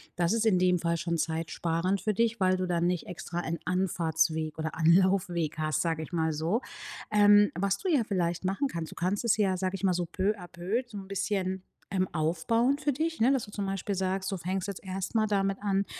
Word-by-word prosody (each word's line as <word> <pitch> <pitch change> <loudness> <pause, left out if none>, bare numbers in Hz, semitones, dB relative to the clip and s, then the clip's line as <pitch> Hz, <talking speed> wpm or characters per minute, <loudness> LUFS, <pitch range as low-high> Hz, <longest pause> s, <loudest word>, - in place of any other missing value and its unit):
das 175 +3 +1
ist 230 0 +1
in 185 -4 +4
dem 180 -1 +3
Fall 170 0 0
schon 170 +1 -1
zeitsparend 165 +4 -1
für 215 -1 0
dich, 230 0 +1
weil 185 0 +3
du 185 - -1
dann 175 0 +1
nicht 180 -2 -1
extra 175 0 -5
einen 170 -1 -3
Anfahrtsweg 160 -4 0
oder 155 0 -3
Anlaufweg 175 -1 +2
hast, 155 -1 0
sage 165 -2 -1
ich 155 - -8
mal 160 -2 0
so. 165 - 0 0.5
Ähm, 205 0 +6
was 200 0 +1
du - - -5
ja 295 -7 +4
vielleicht 175 -3 -1
machen 195 +10 0
kannst: 165 -9 -5
Du - - -11
kannst 185 +6 -1
es 220 - +3
ja, 195 -3 +2
sage 185 +1 -1
ich 195 - -8
mal 185 -2 +3
so, 175 0 -1
peu 195 +4 0
à 180 - -9
peu, 185 +7 -2
so 220 -4 -9
'n 195 -1 -8
bisschen, 190 -1 -2 0.3
ähm, 185 -1 +1
aufbauen 205 - +1
für 295 -1 +1
dich, 320 0 -2
ne? 250 - +5
Dass 265 -5 +1
du 205 - -13
zum 200 -1 -3
Beispiel 195 +1 -2
sagst, 190 +1 -1
du 195 - -2
fängst 185 +2 -3
jetzt 200 -2 -6
erst 190 +1 -4
mal 220 -1 +2
damit 195 -1 +1
an, 200 -1 +1
185 Hz, 230 wpm, -29 LUFS, 170-200 Hz, 0.5 s, Ähm